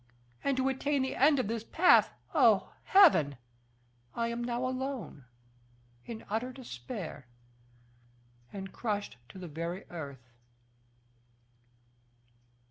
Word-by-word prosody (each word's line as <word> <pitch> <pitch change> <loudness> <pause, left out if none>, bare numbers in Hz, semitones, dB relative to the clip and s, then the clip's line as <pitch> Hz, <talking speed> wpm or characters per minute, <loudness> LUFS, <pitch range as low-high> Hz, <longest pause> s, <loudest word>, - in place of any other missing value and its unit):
And 275 -2 +1
to 260 0 +2
attain 270 +1 0
the 265 - -3
end 285 +2 +5
of 255 - 0
this 225 0 -3
path, 355 +9 +5 0.2
oh, 235 - +4
Heaven! 225 - +6 0.8
I 230 0 0
am 235 +1 -3
now 240 +1 -2
alone, 255 - -4 0.8
in 230 -2 -7
utter 225 +5 -2
despair, 185 - -7 1.2
and 195 -1 -7
crushed 205 - -3
to - - -12
the 185 -1 -7
very 170 +4 -5
earth." 140 -7 -8
230 Hz, 110 wpm, -31 LUFS, 175-260 Hz, 1.2 s, Heaven